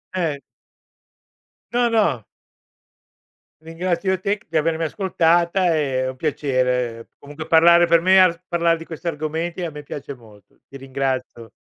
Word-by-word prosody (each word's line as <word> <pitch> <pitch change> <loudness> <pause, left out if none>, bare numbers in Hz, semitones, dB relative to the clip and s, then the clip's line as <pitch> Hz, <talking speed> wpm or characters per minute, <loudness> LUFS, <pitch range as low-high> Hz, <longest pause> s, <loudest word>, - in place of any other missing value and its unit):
Eh. 160 -6 -1 1.3
No, 240 0 +2
no. 165 - +1 1.4
Ringrazio 170 +3 -2
io 190 - -1
te 200 +2 -1
c - - -27
di 160 - -1
avermi 160 +1 0
ascoltata, 175 +1 +1
è 135 -4 0
è 130 - -2
un 130 - -7
piacere, 125 -6 -1
comunque 145 +2 -10
parlare 170 +1 +6
per 170 0 +4
me 190 +2 +5
ar 175 -2 +3
parlare 170 -1 +1
di 165 - -10
questi 165 +1 -8
argomenti 160 +3 -3
a 165 - -4
me 150 0 -9
piace 140 0 -7
molto. 105 -4 -20
Ti - - -15
ringrazio. 130 -3 -4
160 Hz, 150 wpm, -21 LUFS, 135-175 Hz, 1.4 s, parlare